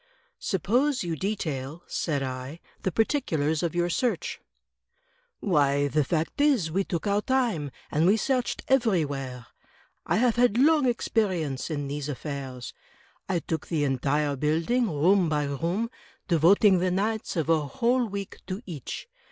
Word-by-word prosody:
"Suppose 250 - +1
you 170 -2 -2
detail," 160 -5 -3
said 145 -4 -1
I, 130 +4 -5 0.2
"the 190 - -1
particulars 160 - +1
of 170 -1 -2
your 175 0 +2
search." 235 +7 -1 1.0
"Why, 145 -5 +2
the 150 +1 +2
fact 160 - -1
is, 255 - +3
we 195 +4 +1
took 170 -3 -3
our 205 0 +2
time, 235 - 0 0.2
and 155 +3 +3
we 205 +3 +5
searched 255 +1 -1
everywhere. 145 - 0 0.6
I - - +2
have 240 0 +2
had 240 -2 +3
long 295 +1 +5
experience 185 - 0
in 145 -3 -3
these 145 +1 -4
affairs. 135 -3 -6 0.6
I 185 - +2
took 160 -1 -4
the 155 -4 0
entire 140 +2 +1
build 155 - 0
ing, 245 -3 +2
room 175 +4 +3
by 150 -1 +1
room; 170 - -2 0.4
devoting 185 +3 +5
the 185 +1 +1
nights 210 +4 -1
of 160 -3 0
a 165 -1 +4
whole 235 - +1
week 200 -1 -6
to 190 +5 -5
each. 155 -9 -6
170 Hz, 150 wpm, -27 LUFS, 145-215 Hz, 1.0 s, we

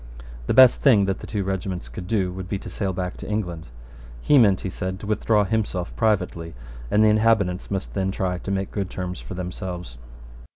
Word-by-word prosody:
The - - +1
best 130 -2 +7
thing 110 -8 +5
that 95 -1 -1
the - - -9
two 105 -3 -2
regiments 95 -1 -3
could 90 - -8
do 95 -4 0
would 95 0 -7
be 100 - -1
to - - -9
sail 100 -2 -2
back 90 0 -4
to - - -8
England. 90 -6 -3 0.5
He 145 - +4
meant, 100 -6 +4
he 95 - -3
said, 95 +1 -4
to 105 - -8
withdraw 105 0 +2
himself 100 -4 -2
privately: 90 -6 0 0.3
and 105 - +4
the 110 - +6
inhabitants 105 -4 +2
must 95 -1 -3
then 95 -1 0
try 90 -2 -2
to - - -7
make 95 -1 -2
good 100 -3 -3
terms 90 -2 -5
for - - -8
themselves. 90 -6 -6
95 Hz, 205 wpm, -24 LUFS, 90-105 Hz, 0.5 s, best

